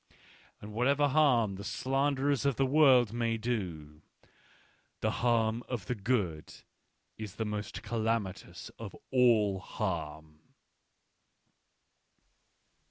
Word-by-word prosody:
" - - -28
And 105 +1 -9
whatever 140 +6 +2
harm 130 -9 +3
the 100 - -7
slanderers 135 +2 0
of 140 -2 +1
the 135 - +2
world 130 -5 +5
may 115 -1 0
do, 90 -10 -4 1.0
the - - +1
harm 115 -1 +2
of 120 -7 -4
the 125 - -1
good 100 -8 -2 0.7
is 105 -3 -7
the 110 - -3
most 105 +1 -5
calamitous 110 -4 -3
of - - -8 0.2
all 110 -6 +3
harm? 80 -6 -5
115 Hz, 105 wpm, -31 LUFS, 100-130 Hz, 1.0 s, world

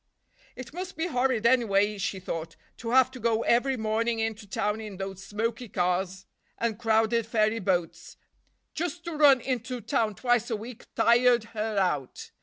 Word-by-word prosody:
It 255 0 -9
must 365 0 -6
be 320 - -1
horrid, 250 -7 0
anyway, 210 -4 +3
she 190 0 -2
thought, 165 -2 -5 0.2
to 230 - -6
have 255 +1 +5
to 260 - -10
go 230 0 +1
every 255 +3 +2
morning 225 +1 0
into 225 -1 -3
town 210 +2 -1
in 210 -3 -8
those 195 0 -6
smoky 225 +3 -3
cars 185 +1 -1 0.3
and 230 -2 -2
crowded 225 0 +2
ferry 220 0 +1
boats; 180 -4 -2 0.6
just 340 +1 -3
to 340 - -5
run 285 -4 +6
into 250 0 -3
town 225 -2 0
twice 245 +1 +1
a 225 - 0
week 225 +3 -9
tired 235 0 +4
her 215 -1 -2
out. 150 -9 -1
225 Hz, 165 wpm, -27 LUFS, 205-245 Hz, 0.6 s, run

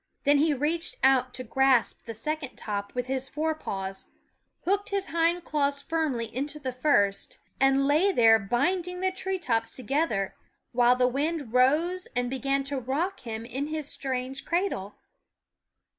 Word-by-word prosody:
Then 285 0 +4
he 310 +2 +3
reached 300 +4 -1
out 260 -1 +4
to 255 - -4
grasp 260 0 +2
the 230 - -6
second 300 +3 -4
top 200 0 -5
with 250 -1 -1
his 265 +1 -2
fore 315 +2 -1
paws, 195 -10 -5 0.6
hooked 400 +3 +1
his 395 -1 -2
hind 335 +1 +1
claws 285 -2 0
firmly 280 -8 -2
into 290 +3 -2
the 265 -3 -4
first, 245 -7 +1 0.2
and 270 0 +4
lay 310 +8 +4
there 225 -8 +6
binding 360 - -1
the 375 0 +1
tree 380 0 -3
tops 230 -9 -1
together, 260 -5 -1 0.4
while 245 0 +4
the 250 0 +3
wind 285 -1 -2
rose 315 +9 +3
and 245 0 0
began 275 +1 0
to 275 0 -2
rock 275 +8 -2
him 225 -3 -6
in 265 +5 -3
his 310 -2 -3
strange 265 0 -3
cradle. 335 - -1
270 Hz, 160 wpm, -27 LUFS, 245-315 Hz, 0.6 s, there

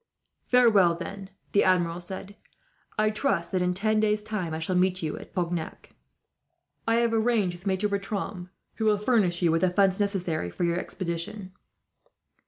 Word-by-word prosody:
"Farewell 210 -9 +5
then," 190 +3 -7 0.2
the 200 - +4
Admiral 175 -2 +2
said. 190 +3 -6 0.6
"I 215 0 +3
trust 215 -6 0
that, 185 - 0
in 180 0 +1
ten 215 +3 +1
days' 210 0 +1
time, 210 -6 -3
I 160 - -2
shall 165 +3 -2
meet 185 0 +1
you 155 - -2
at - - -12
Cognac. 175 -3 -3 1.0
I 225 - +3
have 235 0 +2
arranged 220 -5 +1
with 175 +3 -10
Maitre 190 +2 +1
Bertram, 200 -2 -4 0.3
who 220 - -1
will 210 -1 +4
furnish 200 -6 +1
you 170 - +4
with 165 - +1
the 185 - +4
funds 190 +1 +2
necessary 180 - -1
for 85 - -4
your 170 0 +1
expedition." 185 +3 -5
190 Hz, 170 wpm, -27 LUFS, 175-210 Hz, 1.0 s, Farewell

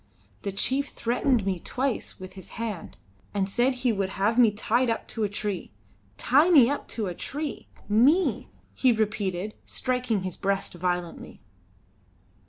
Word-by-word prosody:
The 200 - -3
chief 265 +8 +1
threatened 240 -1 +1
me 190 -2 -1
twice 260 +6 -3
with 185 0 -9
his 190 -1 -11
hand, 220 -6 -5 0.4
and 195 -1 +1
said 245 +6 +1
he 245 - +5
would 195 -2 -1
have 210 +4 +2
me 235 -3 +7
tied 230 +4 +1
up 230 - -2
to 225 - -3
a 205 - +1
tree. 200 -1 -3 0.5
Tie 290 - +4
me 280 -7 +7
up 285 - -3
to 220 - -3
a 180 - -3
tree! 295 - -5 0.2
Me!" 270 - +3 0.3
he 260 - +3
repeated, 210 -3 -1
striking 250 -6 -1
his 185 -2 -4
breast 195 0 -1
violently. 175 -1 -3
215 Hz, 155 wpm, -26 LUFS, 195-250 Hz, 0.5 s, me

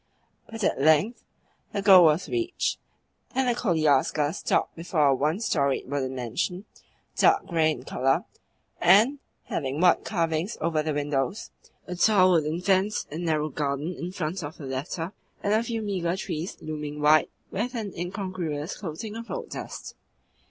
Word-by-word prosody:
But 225 -1 -6
at 135 - +1
length 160 - +3 0.5
the 200 - -2
goal 190 -3 +9
was 155 +3 +3
reached, 355 0 -1 0.6
and 265 -1 +2
the 245 - +3
koliaska 155 - +2
stopped - - 0
before 165 -2 0
a - - +5
one 150 +7 0
storied 140 - 0
wooden 130 -2 -2
mansion, 175 - -3 0.5
dark - - +4
grey 160 -2 +2
in 125 -5 -3
colour, 135 +1 0 0.5
and 215 +11 +5 0.2
having 140 0 -3
white 180 0 +4
carvings 170 +1 -1
over 160 -1 0
the 155 -1 -2
windows, 145 - -2 0.3
a 180 - -5
tall 185 0 +5
wooden 160 0 +1
fence 195 +2 +1
and 165 +3 -4
narrow 155 -2 0
garden 145 +3 -2
in 175 +2 -5
front 180 0 -3
of 145 0 -7
the 145 - -8
latter, 160 +7 -4 0.3
and 205 - +1
a 220 - +3
few 230 -1 -3
meagre 185 -3 -1
trees 165 -1 -4
looming 150 -1 -5
white 150 +1 +4 0.2
with 240 +6 -2
an 215 -4 -4
incongruous 175 -4 -4
coating 200 +5 -6
of 230 +1 -7
road 485 -2 -5
dust. - - -7
170 Hz, 160 wpm, -26 LUFS, 150-200 Hz, 0.6 s, goal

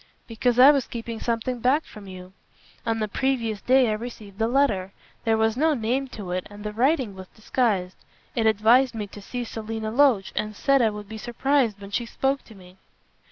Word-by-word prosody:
"Because 240 +1 0
I 260 +3 +9
was 275 -4 0
keeping 230 -1 -6
something 235 +1 -2
back 265 +6 +2
from 210 -2 -12
you. 185 0 -10 0.5
On 225 0 +1
the 215 -1 -1
previous 230 -2 -1
day 260 0 +4
I - - +1
received 215 -2 -7
a 225 - +3
letter. 220 -8 +1 0.3
There 225 -1 +3
was 220 0 +2
no 310 +3 +2
name 250 +3 -1
to 205 -8 -8
it, 180 0 -3
and 205 0 -11
the 210 0 -4
writing 255 -1 +1
was 190 -1 -10
disguised. 210 -5 -1 0.4
It 225 -2 +2
advised 230 +4 +4
me 215 -2 -3
to 205 +1 -12
see 245 +4 -5
Selina 220 -1 -5
Loach, 245 -6 +3
and 215 0 -2
said 275 +4 +3
I 225 - +4
would 210 -1 -8
be 220 +1 -8
surprised 240 -2 0
when 200 0 -10
she 235 +3 -2
spoke 270 +3 -1
to 220 - -15
me." 185 -1 -16
225 Hz, 205 wpm, -25 LUFS, 210-255 Hz, 0.5 s, I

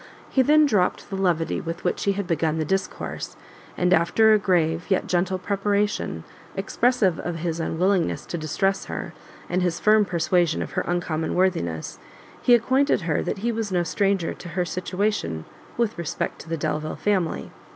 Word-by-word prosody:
He 265 - +4
then 300 +3 +5
dropt 205 -10 +1
the - - -2
levity 175 -4 0
with 165 0 -5
which - - -1
he 200 - +3
had 200 0 -3
begun 160 -2 0
the 155 - 0
discourse, 190 +3 -3 0.4
and 180 0 +3
after 215 +7 +5
a 215 - +5
grave, 170 -3 +1
yet 190 - +2
gentle 185 +1 0
preparation, 200 - -1 0.3
expressive 205 -2 +1
of 175 - -3
his 165 0 -3
unwillingness 175 +2 0
to 175 - -4
distress 195 +6 0
her, - - -5 0.3
and 180 +1 0
his 175 -2 0
firm 215 0 +5
persuasion 175 -1 +1
of - - -8
her - - 0
uncommon 165 -2 -1
worthiness, 130 - 0 0.4
he 245 - +6
acquainted 260 +2 +2
her 165 -3 0
that - - -2
he 235 - +2
was 225 -3 -3
no 175 -1 +2
stranger 195 0 0
to 175 - -10
her 180 +1 -1
situation 180 - -2 0.3
with 230 -5 0
respect 170 - -3
to 160 - -13
the 165 - -1
Delvile 155 +1 -2
family. 190 -6 -1
180 Hz, 170 wpm, -24 LUFS, 165-205 Hz, 0.4 s, he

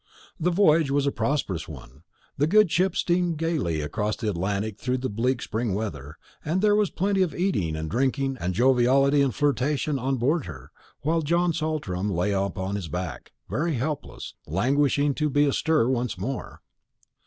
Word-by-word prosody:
The 175 - +1
voyage 165 -5 +4
was 140 0 +1
a 140 - +2
prosperous 115 - -2
one. 65 -2 -11 0.3
The 145 +2 +1
good 210 0 +4
ship 185 +3 +2
steamed 175 -2 +1
gaily 150 - -1
across 105 +8 -2
the 110 -3 -2
Atlantic 100 +3 -2
through 125 +1 -1
the 130 -1 -3
bleak 120 +4 0
spring 110 -2 -2
weather; 75 -8 -5 0.3
and 165 +4 0
there 205 +1 +4
was 210 -3 +2
plenty 195 +1 0
of 175 -5 0
eating 135 - 0
and 80 0 -4
drinking, 135 - 0
and 90 +1 -2
joviality 135 +4 +4
and 140 -2 +2
flirtation 145 0 0
on 135 +2 -1
board 140 - 0
her, 65 -6 -10 0.3
while 160 +4 +1
John 170 +3 +1
Saltram 150 - -2
lay 90 +2 0
upon 95 0 -2
his 95 -5 -5
back, 90 -2 -5 0.2
very 150 - -1
helpless, 140 +4 -4
languishing 140 - +2
to 150 +2 0
be 145 +1 +3
astir 150 -2 +2
once 125 -2 -1
more. 135 0 -5
135 Hz, 170 wpm, -25 LUFS, 100-155 Hz, 0.3 s, voyage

